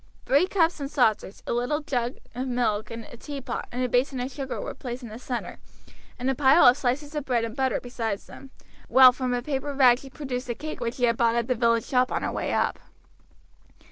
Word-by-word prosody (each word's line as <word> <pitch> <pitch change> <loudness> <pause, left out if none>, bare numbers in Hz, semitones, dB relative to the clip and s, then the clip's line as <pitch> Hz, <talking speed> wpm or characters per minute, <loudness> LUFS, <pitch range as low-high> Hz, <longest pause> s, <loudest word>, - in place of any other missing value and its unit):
Three 285 +7 +3
cups 335 -4 +1
and 280 -1 -4
saucers, 220 -7 0
a - - -2
little 245 +6 0
jag 245 -4 -2 0.2
of 255 +2 -3
milk, 220 -4 0
a 230 0 -9
teapot, 280 +1 -6
and 250 0 -2
basin 260 +1 +1
of 250 +2 -3
sugar 270 -1 -5
were - - -5
placed 250 -1 -7
in 235 - -7
the 220 +2 -9
center, 245 -1 -5 0.6
and 250 0 -3
a 270 - +3
pile 275 +4 +5
of 245 - +8
slices 285 +3 -2
of 300 -2 -2
bread 240 -3 0
and 225 0 -7
butter 265 -1 0
beside 230 -4 -3
them, 270 +6 -14 0.4
while 260 -1 +8
from 255 0 -3
a 245 - -3
paper 280 0 -3
bag 250 -3 +6
she 270 - -11
produced 260 -3 -5
a 240 - -1
cake 310 +6 -6
which 235 0 -3
she 250 - -5
had 235 -1 +3
bought 230 -1 +3
at 235 -1 0
the 255 - +2
village 230 -1 +2
shop 250 -1 +1
on - - -1
her - - -1
way - - -2
up. - - 0
250 Hz, 225 wpm, -26 LUFS, 240-270 Hz, 0.6 s, of